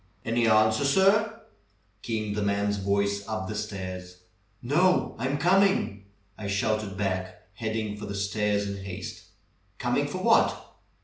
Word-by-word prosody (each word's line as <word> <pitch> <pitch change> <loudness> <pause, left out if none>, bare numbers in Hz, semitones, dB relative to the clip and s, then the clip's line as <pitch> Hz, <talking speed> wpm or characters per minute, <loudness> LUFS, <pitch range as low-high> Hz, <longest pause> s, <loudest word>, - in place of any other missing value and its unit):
"Any 115 0 +2
answer, 110 +2 +4
sir?" 195 +9 +3 0.6
came 110 -3 -2
the 105 - -2
man's 100 0 0
voice 100 +1 0
up 110 -3 -3
the 105 - -4
stairs. 95 -4 -5 0.4
"No! 175 +10 +2
I'm 130 +4 0
coming!" 185 - +2 0.3
I 105 - -4
shouted 100 0 -1
back, 95 -2 -3
heading 110 -2 -3
for 105 0 -7
the 100 - -5
stairs 100 +1 0
in 100 -1 -5
haste. 95 -1 -7 0.5
"Coming - - 0
for - - -4
what? - - +2
105 Hz, 135 wpm, -27 LUFS, 100-115 Hz, 0.6 s, answer